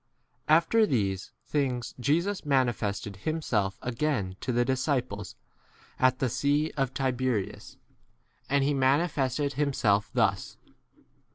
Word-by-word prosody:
After 170 +8 +4
these 100 - -1
things 130 -5 -1
Jesus 170 +10 0
manifested 120 - 0
himself 110 -8 -1
again 120 -7 -1
to - - -2
the 120 0 +2
disciples 130 - -1 0.6
at 130 0 +4
the 130 - 0
sea 145 +5 +1
of 135 -3 0
Tiberias. 130 -6 -2 0.7
And 140 0 +3
he 145 +1 +2
manifested 140 0 +1
himself 120 -8 +1
thus. - - 0
130 Hz, 105 wpm, -28 LUFS, 120-145 Hz, 0.7 s, After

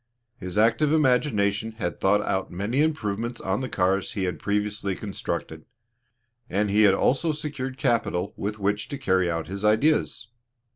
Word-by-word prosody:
His 90 -3 -6
active 115 +7 +3
imagination 115 -8 +2
had 95 -6 -4
thought 105 +2 +3
out 95 0 -1
many 105 +10 -1
improvements 120 -6 -1
on 95 +5 -1
the 130 - -3
cars 95 +1 0
he 100 -5 -2
had 90 -1 -2
previously 105 -1 -1
constructed; 85 -6 -5 0.8
and 100 +1 0
he 105 +2 +4
had 95 - +3
also 140 +10 +2
secured 140 -3 -5
capital 115 -8 0
with 105 +1 -4
which 105 +1 -1
to 140 - -5
carry 95 -8 +1
out 80 -1 -2
his 100 +4 -6
ideas. 115 +4 +2
105 Hz, 155 wpm, -25 LUFS, 95-125 Hz, 0.8 s, he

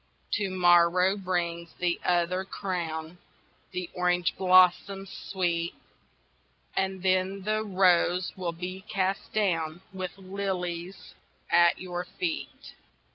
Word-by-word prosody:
To 205 -2 0
morrow 180 +1 +4
brings 170 -3 -2
the 175 -1 0
other 180 +1 +1
crown, 175 -4 -4 0.5
The 180 -1 -4
orange 180 -1 +1
blossoms, 185 +1 +4
Sweet, 170 -3 -2 1.0
And 190 -1 -1
then 185 +1 +1
the 215 +1 0
rose 185 -2 +2
will 180 -2 -2
be 180 +3 -6
cast 195 -1 -1
down 170 -5 0
With 185 0 -5
lilies 185 -2 -4 0.4
at 170 0 +5
your 180 -1 -4
feet. 330 - -5
185 Hz, 105 wpm, -28 LUFS, 175-190 Hz, 1.0 s, at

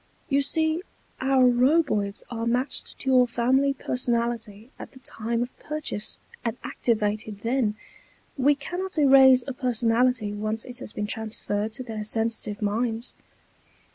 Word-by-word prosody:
"You 280 0 +3
see, 315 +3 +1 0.4
our 265 0 +3
Roboids 245 -5 +2
are 230 -1 -3
matched 250 +4 -1
to 265 - -3
your 250 -1 +5
family 260 +4 +2
personality 235 -3 -2
at - - -9
the 260 - -14
time 235 -1 -3
of 245 - -9
purchase, 300 -8 -4 0.3
and 230 +1 -2
activated 215 -2 -1
then. 230 -2 0 0.6
We 285 +1 +3
cannot 355 +6 -5
erase 265 -3 +7
a 270 - -4
personality 240 -2 +1
once 215 +2 -3
it 250 0 -8
has 220 - -8
been 210 - -3
transferred 215 -1 -1
to 255 - -6
their 220 -3 -5
sensitive 220 -1 -1
minds." 225 +3 -1
240 Hz, 140 wpm, -25 LUFS, 220-265 Hz, 0.6 s, erase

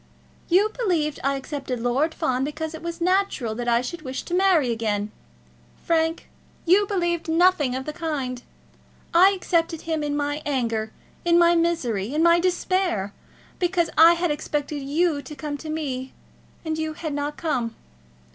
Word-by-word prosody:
"You 395 +5 +4
believed 335 -11 0
I 275 +1 +1
accepted 270 -2 -4
Lord 265 +7 0
Fawn 255 0 0
because 310 +3 -4
it 320 - -8
was 340 0 -5
natural 365 - +1
that 240 +2 -5
I 235 0 +3
should 310 +7 -6
wish 260 -2 -5
to 345 - -7
marry 355 -9 +3
again! 210 -2 -1 0.7
Frank, 325 0 0 0.4
you 390 +4 +4
believed 345 -4 -1
nothing 325 -6 +3
of 265 0 -4
the 305 - -4
kind. 280 -7 -3 0.7
I 360 +3 +7
accepted 335 -4 0
him 320 -1 -2
in 290 0 -1
my 290 +1 -2
anger, 230 -6 -1 0.3
in 340 0 +4
my 345 0 +6
misery, 285 - 0
in 315 - +2
my 340 0 +6
despair, 355 - 0 0.5
because 350 -2 +1
I 330 +2 +8
had 345 -1 0
expected 295 -1 -3
you 295 +2 0
to 300 - -10
come 290 +1 -4
to 315 - -8
me, 270 -5 -4 0.5
and 315 0 -2
you 315 0 -2
had 310 -1 -5
not 290 +1 -3
come!" 240 -8 -2
310 Hz, 165 wpm, -24 LUFS, 265-340 Hz, 0.7 s, I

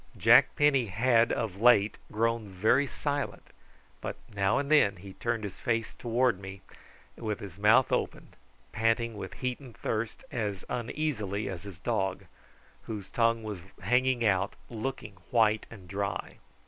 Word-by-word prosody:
Jack - - +6
Penny 140 -5 +3
had 115 +3 +3
of 105 -3 -2
late 115 -4 +5 0.2
grown 115 0 0
very 110 +9 +2
silent, 145 +1 -3 0.5
but - - -4 0.2
now 100 +1 +2
and 140 +1 -2
then 125 -10 +5
he 95 +1 -11
turned 120 0 -2
his 100 - -6
face 115 -1 -1
towards 120 -3 +1
me 95 0 -8 0.5
with 110 -2 -3
his 100 -2 -9
mouth 115 +5 +5
open, - - -2 0.4
panting 115 +1 +1
with 100 - -7
heat 125 -1 -1
and 130 -5 -13
thirst, 110 0 -3
as 105 -5 -3
uneasily 115 -5 -2
as 95 -3 -5
his 100 -4 -10
dog, 95 0 -1 0.6
whose 105 -4 -6
tongue 115 -1 +2
was 105 -3 -5 0.2
hanging 125 +3 +2
out 95 -3 +2 0.2
looking 115 -4 -5
white 110 -2 +3
and 100 -6 -12
dry. 100 +1 -3
110 Hz, 150 wpm, -29 LUFS, 100-120 Hz, 0.6 s, Jack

